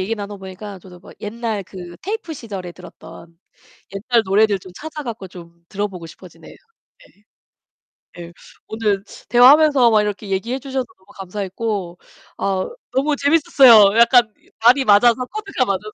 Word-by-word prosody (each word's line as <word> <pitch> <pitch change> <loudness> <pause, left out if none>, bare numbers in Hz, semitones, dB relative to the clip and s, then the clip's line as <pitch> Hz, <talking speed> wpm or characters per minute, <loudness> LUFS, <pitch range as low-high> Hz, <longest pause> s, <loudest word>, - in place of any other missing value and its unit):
얘기 205 +5 -2
나눠 205 -1 -7
보니까 190 +1 -10
저도 180 0 -15
뭐 - - -15
옛날 220 -1 -4
그 175 -2 -11
테이프 410 -4 -5
시절에 200 - -8
들었던 170 -1 -15 0.6
옛날 230 +4 +1
노래들 205 +1 +2
좀 185 -1 -14
찾아 305 +3 -8
갖고 225 -7 -7
좀 170 -1 -15
들어보고 195 -4 -5
싶어지네요. 180 +2 -15 0.6
예. 205 - -30 1.0
예, 170 0 -11 0.3
오늘 210 -3 -2 0.2
대화하면서 265 +2 +6
막 215 -1 +3
이렇게 210 0 -5
얘기해 230 +7 -2
주셔서 265 -1 -4
너무 190 - -30
감사했고 195 -1 -5 0.4
어 190 -1 -2 0.2
너무 290 +3 0
재밌었어요. 265 -9 +5
약간 235 -1 +5 0.3
밥이 250 +4 +4
맞아서, 235 +4 +4
코드가 400 -7 -3
맞아서. 210 0 -4
210 Hz, 330 characters per minute, -19 LUFS, 190-245 Hz, 1.0 s, 대화하면서